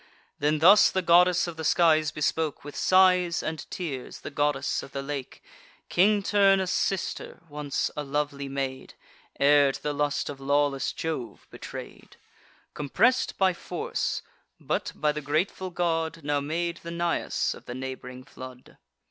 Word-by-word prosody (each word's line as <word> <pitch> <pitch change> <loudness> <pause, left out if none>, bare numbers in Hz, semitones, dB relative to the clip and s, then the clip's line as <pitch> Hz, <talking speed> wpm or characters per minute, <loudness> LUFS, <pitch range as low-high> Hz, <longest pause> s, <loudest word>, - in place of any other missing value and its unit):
Then 150 +1 +2
thus 190 +7 +7
the 190 - -1
goddess 180 +1 +5
of 170 -2 -7
the 160 - -5
skies 155 -1 +4
bespoke, 155 0 -1
With 145 0 -9
sighs 180 -2 +4
and 160 -1 -5
tears, 145 -8 -6
the - - -7
goddess 145 -1 0
of - - -12
the 140 - -3
lake, 140 -2 -6 0.5
King 200 +3 +3
Turnus' 195 -2 +3
sister, 195 -2 -2
once 145 -1 -2
a 150 - -3
lovely 140 -1 -2
maid, 135 -1 -4 0.4
Ere 145 0 +5
to - - -9
the 150 - -1
lust 145 0 -1
of 140 -1 -6
lawless 140 0 +1
Jove 155 -8 -5
betray'd: - - -10 0.6
Compress'd 150 - +1
by 190 -1 +3
force, - - -3 0.4
but, - - -2
by 150 0 +1
the 150 0 -5
grateful 160 +6 -1
god, 165 -2 -1
Now 145 0 0
made 170 +4 -2
the 170 - -9
Nais 170 0 -1
of - - -14
the 120 - -6
neighb'ring 130 -1 -7
flood. 130 -1 -12
150 Hz, 150 wpm, -27 LUFS, 140-175 Hz, 0.6 s, thus